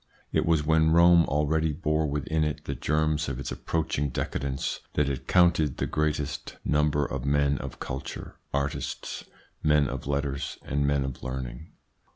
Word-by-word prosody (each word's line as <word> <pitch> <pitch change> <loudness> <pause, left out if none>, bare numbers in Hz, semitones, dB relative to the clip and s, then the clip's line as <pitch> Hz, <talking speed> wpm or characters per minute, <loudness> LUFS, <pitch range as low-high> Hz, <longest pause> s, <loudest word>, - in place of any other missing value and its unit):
It - - +1
was 80 -3 +3
when 80 0 +4
Rome 85 0 +6
already 75 +2 +1
bore 75 0 0
within 75 +2 0
it 75 -1 -3
the 70 - -2
germs 75 +2 0
of 65 -1 -4
its 70 - -4
approaching 75 -3 -1
decadence 65 +1 -2
that 75 - +2
it 70 -2 -3
counted 85 -5 +4
the - - 0
greatest 75 -2 -2
number 75 -1 +2
of 70 -2 -4
men 70 0 +2
of - - -7
culture, 65 +1 -6
artists, 70 0 -3 0.4
men 75 -2 +4
of 65 0 -5
letters, 70 -1 -2
and 70 +1 0
men 70 -1 +2
of 65 -2 -6
learning. 65 +2 -6
75 Hz, 160 wpm, -27 LUFS, 70-80 Hz, 0.4 s, Rome